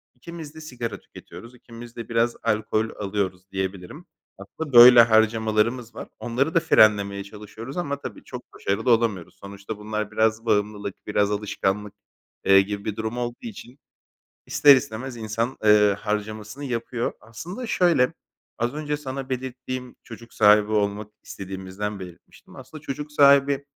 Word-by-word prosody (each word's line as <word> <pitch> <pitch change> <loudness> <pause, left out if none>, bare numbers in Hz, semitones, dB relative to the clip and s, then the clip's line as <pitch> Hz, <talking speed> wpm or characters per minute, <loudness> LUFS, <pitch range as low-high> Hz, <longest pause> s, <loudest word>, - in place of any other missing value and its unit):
ikimiz 160 +2 -10
de 160 - -10
sigara 125 -6 -6
tüketiyoruz, 120 +2 -13
ikimiz 120 0 -13
de 115 -1 -8
biraz 115 0 +1
alkol 110 +1 0
alıyoruz 95 -2 -3
diyebilirim. 95 -1 -5 0.3
Aslında 135 +9 -8
böyle 120 0 +11
harcamalarımız 110 +1 +1
var. - - -7
Onları 130 +6 -1
da - - +6
frenlemeye 100 -10 +3
çalışıyoruz 105 - -10
ama 140 -5 -3
tabii - - -8
çok - - -9
başarılı 100 +6 -1
olamıyoruz. 110 -6 0
Sonuçta 100 +2 -8
bunlar 105 0 -4
biraz 110 +1 +1
bağımlılık, 105 -2 -1
biraz 105 0 +1
alışkanlık, 105 0 -2 0.5
eee, 95 0 +7
gibi 100 +1 -5
bir 105 - -3
durum 110 +2 -4
olduğu 120 0 -3
için 145 - -10 0.7
ister 140 -2 +6
istemez 120 +1 -5
insan, 115 +3 -3
eee, 105 -1 +5
harcamasını 105 +5 -4
yapıyor. 120 -1 -3
Aslında 170 - -8
şöyle: 170 - +2 0.5
Az 120 +3 -1
önce 150 -1 -3
sana 135 -2 -6
belirttiğim 130 0 -5
çocuk 115 0 -13
sahibi 105 0 +5
olmak 105 0 -1
istediğimizden 95 +1 -6
belirtmiştim. 90 -2 -13
Aslında 135 +4 -11
çocuk 150 +1 -6
sahibi, 140 -1 +4
110 Hz, 140 wpm, -24 LUFS, 105-130 Hz, 0.7 s, böyle